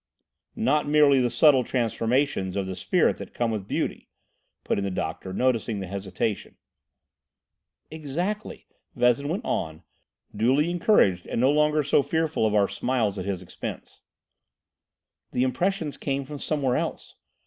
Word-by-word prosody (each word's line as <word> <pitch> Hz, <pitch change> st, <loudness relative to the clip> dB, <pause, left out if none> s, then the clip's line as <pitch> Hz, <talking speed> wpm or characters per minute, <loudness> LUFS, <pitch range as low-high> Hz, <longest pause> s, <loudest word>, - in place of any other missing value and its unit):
"Not 150 Hz, +2 st, +1 dB
merely 145 Hz, -2 st, +5 dB
the 120 Hz, -, +2 dB
subtle 140 Hz, -1 st, +5 dB
transformations 120 Hz, -3 st, 0 dB
of 100 Hz, -1 st, -1 dB
the 95 Hz, 0 st, -5 dB
spirit 90 Hz, -, +1 dB
that -, -, -10 dB
come 120 Hz, -1 st, 0 dB
with 105 Hz, -3 st, -4 dB
beauty," -, -, -3 dB, 0.5 s
put -, -, 0 dB
in -, -, -2 dB
the 100 Hz, -, -1 dB
doctor, 90 Hz, 0 st, -4 dB
noticing 115 Hz, -1 st, 0 dB
his 95 Hz, -1 st, -6 dB
hesitation. 100 Hz, +2 st, -3 dB, 1.4 s
"Exactly," 170 Hz, +8 st, -4 dB, 0.3 s
Vezin 125 Hz, +4 st, +2 dB
went 195 Hz, +8 st, -3 dB
on, 80 Hz, +1 st, -3 dB, 0.5 s
duly 135 Hz, +10 st, +2 dB
encouraged 170 Hz, -, +3 dB
and -, -, -2 dB
no 130 Hz, +3 st, +4 dB
longer 150 Hz, 0 st, +2 dB
so 140 Hz, +1 st, +3 dB
fearful 160 Hz, -6 st, 0 dB
of 105 Hz, -, 0 dB
our 100 Hz, -1 st, +4 dB
smiles 105 Hz, -1 st, -1 dB
at 90 Hz, -, -4 dB
his 95 Hz, -2 st, -3 dB
expense. 85 Hz, -, -8 dB, 1.3 s
"The 125 Hz, -, +2 dB
impressions 160 Hz, +3 st, -1 dB
came 140 Hz, -1 st, -2 dB
from 145 Hz, +1 st, -8 dB
somewhere 135 Hz, -5 st, 0 dB
else. -, -, -4 dB
125 Hz, 145 wpm, -25 LUFS, 100-150 Hz, 1.4 s, merely